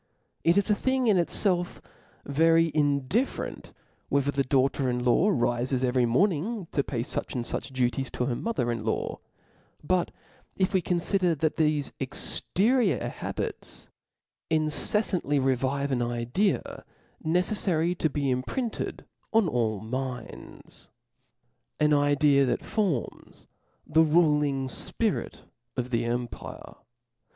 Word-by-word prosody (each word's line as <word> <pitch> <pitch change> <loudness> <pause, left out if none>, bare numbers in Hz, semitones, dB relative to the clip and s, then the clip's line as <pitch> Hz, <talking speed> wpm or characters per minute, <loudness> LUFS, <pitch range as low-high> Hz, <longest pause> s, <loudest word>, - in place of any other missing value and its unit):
It 170 +3 +4
is 200 - +3
a - - +6
thing 260 +4 0
in 210 -5 +4
itfelf 175 0 +1 0.5
very 165 +3 +3
indifferent 145 - -1 0.4
whether 140 0 +1
the 140 -1 0
daughter 135 0 +1
in 125 0 -1
law 125 - +3
rifes 125 - 0
every 125 -1 +2
morning 190 - +1
to 140 - +1
pay 120 -4 -3
fuch 120 - -3
and 120 -2 -2
fuch 135 - -4
duties 130 0 0
to 125 - -1
her 125 - -1
mother 125 - -1
in 115 -2 -3
law: 110 - -2 0.6
but 180 +3 +1 0.5
if 185 -1 0
we 190 - +3
confider 180 0 +1
that 155 +3 0
thefe 150 -3 +1
exterior 195 - +1
habits - - -5 0.6
inccf 160 +5 +1
fandy 145 0 0
revive 135 +2 0
an 125 -2 +1
idea 120 - -1 0.4
neceflary 175 0 +1
to 160 - +2
be 140 -2 -1
imprinted 210 - -3 0.3
on 225 -4 +4
all 115 -7 0
minds, 125 +1 -7 0.9
an 150 0 +4
idea 145 -1 +4
that - - -1
forms 185 - -3 0.4
the 160 +1 +3
ruling 150 -4 +2
fpirit 130 - -2 0.4
of 125 0 -2
the 115 -1 0
empire, 120 0 -4
OP - - -15
LAWS. - - -33
145 Hz, 130 wpm, -27 LUFS, 125-175 Hz, 0.9 s, a